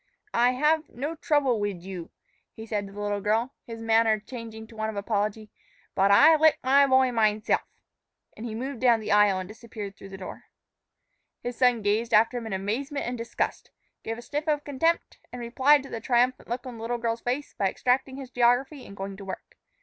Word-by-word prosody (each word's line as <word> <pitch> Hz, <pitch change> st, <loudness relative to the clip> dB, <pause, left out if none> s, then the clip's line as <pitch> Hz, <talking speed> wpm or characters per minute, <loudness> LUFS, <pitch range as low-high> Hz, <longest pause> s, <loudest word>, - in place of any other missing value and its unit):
"I 245 Hz, +2 st, +4 dB
hav 305 Hz, +4 st, +2 dB
v -, -, -27 dB
no 285 Hz, +6 st, -3 dB
trouble 290 Hz, -7 st, +1 dB
wid 200 Hz, -4 st, -3 dB
you," 185 Hz, -3 st, -7 dB, 0.5 s
he 220 Hz, -, -8 dB
said 210 Hz, -2 st, -3 dB
to -, -, -12 dB
the 205 Hz, -, -10 dB
little 205 Hz, 0 st, -2 dB
girl, 225 Hz, +6 st, 0 dB
his 225 Hz, -1 st, -7 dB
manner 225 Hz, -1 st, +3 dB
changing 225 Hz, 0 st, -9 dB
to 225 Hz, -, -16 dB
one 220 Hz, 0 st, -2 dB
of 220 Hz, -, -6 dB
apology, 210 Hz, +1 st, -2 dB, 0.4 s
"bud 195 Hz, +1 st, +3 dB
I 295 Hz, +11 st, +7 dB
lick 315 Hz, 0 st, +5 dB
my 275 Hz, +2 st, +5 dB
boy 260 Hz, -1 st, +4 dB
mineself," 215 Hz, -2 st, +2 dB, 0.7 s
and 220 Hz, -, -9 dB
he 225 Hz, -2 st, -5 dB
moved 260 Hz, +2 st, -4 dB
down 240 Hz, -3 st, +5 dB
the 215 Hz, -, -4 dB
aisle 205 Hz, -2 st, +5 dB
and 185 Hz, -1 st, -4 dB
disappeared 215 Hz, -2 st, -8 dB
through 195 Hz, -, -12 dB
the 195 Hz, -, -8 dB
door. 190 Hz, -, -9 dB, 1.0 s
His 245 Hz, 0 st, -4 dB
son 245 Hz, -3 st, +3 dB
gazed 215 Hz, +3 st, +1 dB
after 225 Hz, +3 st, +4 dB
him 230 Hz, -, -7 dB
in 220 Hz, -, -4 dB
amazement 245 Hz, +10 st, -2 dB
and 245 Hz, -, -3 dB
disgust, 230 Hz, 0 st, -3 dB, 0.3 s
gave 225 Hz, 0 st, -4 dB
a 240 Hz, -, -9 dB
sniff 295 Hz, +5 st, -4 dB
of 295 Hz, -1 st, +1 dB
contempt, 325 Hz, +4 st, 0 dB
and 250 Hz, -, -7 dB
replied 260 Hz, +4 st, +3 dB
to 275 Hz, -, -10 dB
the 225 Hz, -, -5 dB
triumphant 245 Hz, +2 st, +1 dB
look 245 Hz, +2 st, -3 dB
on 250 Hz, -2 st, -7 dB
the -, -, -10 dB
little 240 Hz, +2 st, -2 dB
girl's 230 Hz, 0 st, -2 dB
face 260 Hz, +4 st, -3 dB
by 195 Hz, -2 st, 0 dB
extracting 260 Hz, +5 st, 0 dB
his 265 Hz, -2 st, -8 dB
geography 250 Hz, +4 st, +1 dB
and 200 Hz, -, -12 dB
going 195 Hz, 0 st, -6 dB
to 195 Hz, -, -9 dB
work. 190 Hz, -, -8 dB
230 Hz, 210 wpm, -26 LUFS, 210-260 Hz, 1.0 s, I